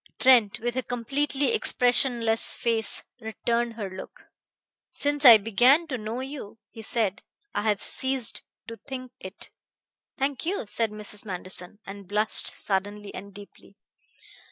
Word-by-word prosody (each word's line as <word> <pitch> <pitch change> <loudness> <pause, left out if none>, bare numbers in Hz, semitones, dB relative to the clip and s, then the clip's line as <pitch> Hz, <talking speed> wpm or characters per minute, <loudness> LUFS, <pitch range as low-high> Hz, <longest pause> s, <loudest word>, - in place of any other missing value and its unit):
Trent, 245 -6 +4
with 240 +1 -3
a 260 - 0
completely 275 - -1
expressionless 245 - +1
face, 225 -2 -1 0.2
returned 235 +1 -2
her 215 -3 -5
look. 190 0 -11 0.7
"Since 290 0 -2
I 235 -3 +11
began 245 - +3
to 255 - -2
know 220 +4 -5
you," 265 -6 -8
he 225 - -10
said, 220 -1 -1 0.3
"I - - -1
have 205 -1 -1
ceased 260 -3 -2 0.3
to 230 - -8
think 255 -1 -8
it." 190 +1 -10 0.7
"Thank 275 -1 -2
you," 355 - -2
said 225 +2 0
Mrs. 210 0 -1
Manderson; 185 -1 -6
and 195 -1 -10
blushed 210 +2 +5
suddenly 205 +1 -2
and 200 +1 -9
deeply. 200 0 -15
230 Hz, 135 wpm, -26 LUFS, 205-255 Hz, 0.7 s, I